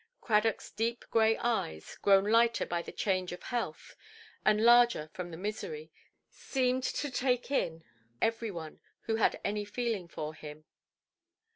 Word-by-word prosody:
Cradockʼs 220 -1 +1
deep 230 +1 -1
grey 225 -1 +4
eyes, 150 - -2
grown 195 -1 +5
lighter 230 +2 +3
by 170 0 -2
the - - -9
change 185 -3 -1
of 175 - -8
health, 240 -1 -4 0.5
and 215 0 +4
larger 240 -9 +5
from 180 -1 -5
the 165 - -8
misery, 220 - -5 0.4
seemed 255 -1 -1
to 290 -2 -2
take 250 0 0
in 165 - -1 0.4
every 225 0 0
one 165 -5 -7 0.2
who 225 -1 -1
had 225 - +2
any 210 +1 -1
feeling 210 -3 -2
for 155 -2 -5
him. 155 0 -10
220 Hz, 145 wpm, -31 LUFS, 180-235 Hz, 0.5 s, grown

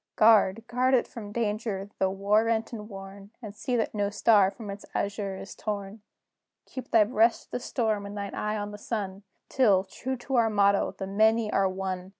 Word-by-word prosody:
Guard, 215 -1 +5
guard 255 +2 +2
it 245 - +1
from 210 -3 -9
danger, 210 -2 -2
though 190 - +2
war 200 +3 +2
rent 225 +1 -1
and 210 -1 -7
worn, 195 0 -10
And 210 -4 -9
see 250 +3 -2
that 225 - 0
no 205 -1 0
star 205 -1 +4
from 205 +1 -8
its 200 +1 -8
azure 200 -1 -2
is 195 - -8
torn! 205 0 -5 0.6
Keep 260 - -8
thy 225 - +6
breast 225 +1 +2
to - - -30
the - - -2
storm, 220 -4 -1
and 205 +1 -8
thine 200 0 -5
eye 210 0 -2
on 205 0 -4
the 205 - -9
sun, 200 -3 -4 0.3
Till, 205 -8 +3
true 260 +7 -5
to 255 +2 -2
our 230 -1 +4
motto, 200 -1 +2
THE 195 - -4
MANY 220 +2 +2
ARE 195 -1 +3
ONE! 185 -1 -4
210 Hz, 200 wpm, -27 LUFS, 200-225 Hz, 0.6 s, thy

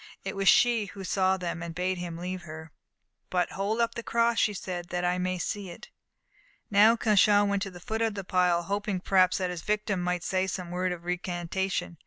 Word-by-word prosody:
It 195 - -4
was 195 -1 +3
she 235 -4 +4
who 195 +1 -9
saw 190 0 +1
them 175 -2 -4
and 170 -1 -6
bade 180 +1 -1
him 170 -2 -5
leave 180 +1 -5
her. 160 -1 -10 0.6
"But 180 -1 0
hold 205 +4 -2
up 230 0 +1
the 235 - -5
cross," 235 0 +1
she 210 - +2
said, 175 -2 -5
"that 180 0 -2
I 180 +1 +1
may 185 0 -1
see 195 +2 -4
it." 170 - -11 0.8
Now 210 +3 +6
Cauchon 205 -2 +4
went 200 -1 0
to 195 - -2
the 180 -2 -11
foot 220 +5 -4
of 225 -2 0
the 195 - -4
pile, 180 -2 +2
hoping 200 +1 -2
perhaps 185 -1 +3
that 185 -1 -1
his 175 -2 -5
victim 210 -2 -1
might 180 0 -1
say 185 0 0
some 180 -2 -5
word 180 +1 -1
of 175 -1 -6
recantation. 180 0 -2
185 Hz, 215 wpm, -28 LUFS, 180-205 Hz, 0.8 s, Now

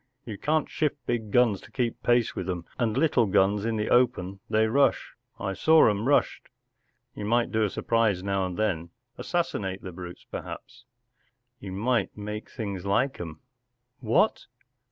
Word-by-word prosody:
You 110 - -6
can't 155 +8 0
shift 150 -1 -1
big 115 -3 -2
guns 115 -3 +3
to - - -15
keep 120 -1 -2
pace 120 -1 +2
with 90 - -4
them, 90 -2 -3
and 115 -3 0
little 135 -8 +3
guns 100 +1 +2
in 115 -1 0
the 105 -1 -2
open 110 -6 +2
they 110 +1 +3
rush. 135 +5 +2 0.3
I 100 -1 -2
saw' 160 +10 +5
'em 105 +4 -2
rushed. 145 - +1 0.6
You - - -7
might 120 +2 +1
do 110 0 +2
a 105 - +1
surprise 110 -4 +1
now 95 -1 0
and 90 - -6
then—assassinate 105 - -3
the 95 - -6
brutes, 90 0 -9
perhaps——” 120 +1 -8 0.7
“You 95 - -7
might 110 +1 0
make 105 +1 -6
things 100 -6 -5
like 120 +8 0
'em.” 80 -2 -8 0.3
“ - - -52
What - - +1
110 Hz, 165 wpm, -27 LUFS, 95-120 Hz, 0.7 s, saw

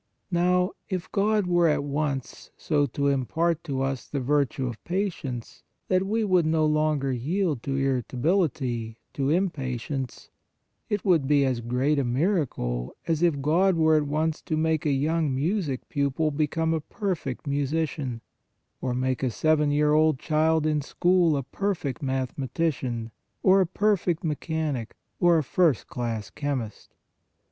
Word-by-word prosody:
Now, 180 +2 +2 0.2
if 185 -3 -4
God 210 0 +2
were 175 -1 +3
at 150 -2 +1
once 140 -2 -3
so 145 -2 +1
to 140 +3 -1
impart 160 +5 0
to 135 -4 -1
us 135 -1 -3
the 140 - -3
virtue 135 0 0
of 120 -3 -6
patience, 170 - -3 0.3
that 185 +1 +2
we 220 +2 +1
would 185 -5 +3
no 160 -1 +2
longer 150 -3 +1
yield 150 +3 -1
to 135 +2 -3
irritability, 130 - 0 0.2
to 135 -1 -1
im 185 +3 +2
patience, 130 -1 -5 0.6
it 210 -1 -1
would 165 -8 +3
be 145 -1 +4
as 125 -3 0
great 130 +5 +1
a - - +1
miracle, 120 - -1
as 165 -2 0
if 155 -6 +2
God 180 +5 +3
were 160 -1 +4
at 150 -1 +2
once 155 +2 -1
to 155 - -2
make 160 -1 +1
a - - +3
young 150 +1 +1
music 150 -2 -1
pupil 145 +2 0
become 160 +2 0
a 160 - -1
perfect 165 - -4
musician, 140 -3 -2 0.6
or 125 -2 -1
make 130 0 -1
a 130 - +1
seven 150 +4 +2
year 150 +1 +3
old 155 -1 +4
child 155 +2 +1
in 150 -1 +1
school 175 +1 +2
a 135 - -2
perfect 155 - -3
mathematician, 130 -2 -2 0.3
or 190 +1 +6
a 185 - +2
perfect 185 -3 +1
me 155 -3 +1
chanic, 150 -7 -3 0.3
or 175 -1 +5
a 155 - +1
first 160 -1 +2
class 115 -4 -4
chemist 140 -7 -4
150 Hz, 155 wpm, -26 LUFS, 135-165 Hz, 0.6 s, or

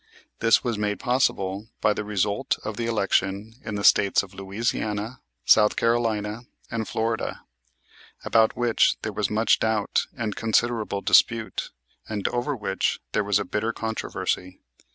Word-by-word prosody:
This 115 0 +4
was 115 -4 -2
made 105 -2 -1
possible 105 -5 0
by 105 - +3
the 105 - -4
result 105 +4 0
of 110 - -4
the 115 +2 -2
election 100 -1 0
in 110 - -4
the 100 - -3
States 100 -1 +5
of 100 0 -12
Louisiana, 105 +3 -3 0.3
South 105 -1 +5
Carolina, 115 -1 0 0.2
and 115 -2 -2
Florida, 115 +1 -2 0.8
about 110 -1 +3
which 120 -2 +3
there 110 - -3
was 105 -1 -1
much 110 +2 +3
doubt 110 -2 0
and 110 -4 -3
considerable 115 -2 0
dispute, 115 +1 +2 0.4
and 105 -2 -2
over 120 +4 -1
which 95 -4 -1
there - - +1
was 100 -1 +2
a - - -2
bitter 110 +2 -1
controversy. 110 -4 -3
110 Hz, 145 wpm, -25 LUFS, 105-115 Hz, 0.8 s, States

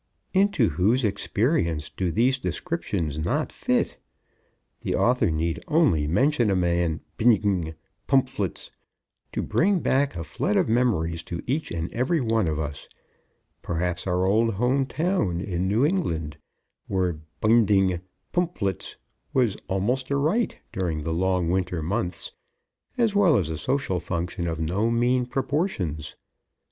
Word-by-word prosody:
Into 190 - +3
whose 105 - +2
experience 100 - 0
do 90 -3 -2
these 125 +7 +2
descriptions 100 - -2
not 80 - -1
fit? - - 0 0.8
The - - -2
author 125 -5 +3
need 80 +1 -1
only 140 - +3
mention 120 - +2
a 95 - +2
man 85 -2 +1 0.2
bindg 100 -8 +2 0.3
pmphlts 130 - 0 0.6
to - - -2
bring 195 +1 +2
back 140 -2 +1
a 85 - -4
flood - - -1
of - - +3
memories 100 -9 +1
to 85 -2 -5
each 145 +5 -1
and 85 0 -4
every 130 +8 +1
one 115 - +1
of 75 -1 -1
us 75 -1 -5 0.7
perhaps 90 +2 -2
our 90 0 +1
old 110 +2 +2
home 130 +5 +1
town 155 - 0
in 90 -1 -2
New 110 +8 +3
England 85 - -1 0.5
where 90 -4 0 0.2
bindg 100 -5 +3 0.3
pmphlts 165 - -1 0.4
was 120 -6 +2
almost 115 +8 0
a 140 - +1
rite 160 +12 +1 0.2
during 85 -5 -2
the 80 - -2
long 90 0 +1
winter 90 -3 -1
months, 95 +2 -2 0.7
as 230 -4 +2
well 190 -9 +5
as 80 -6 -1
a - - -2
social 125 - 0
function 85 0 -3
of 80 -1 -3
no 90 +8 0
mean 120 +1 +2
proportions. 125 - -2
100 Hz, 135 wpm, -25 LUFS, 85-130 Hz, 0.8 s, well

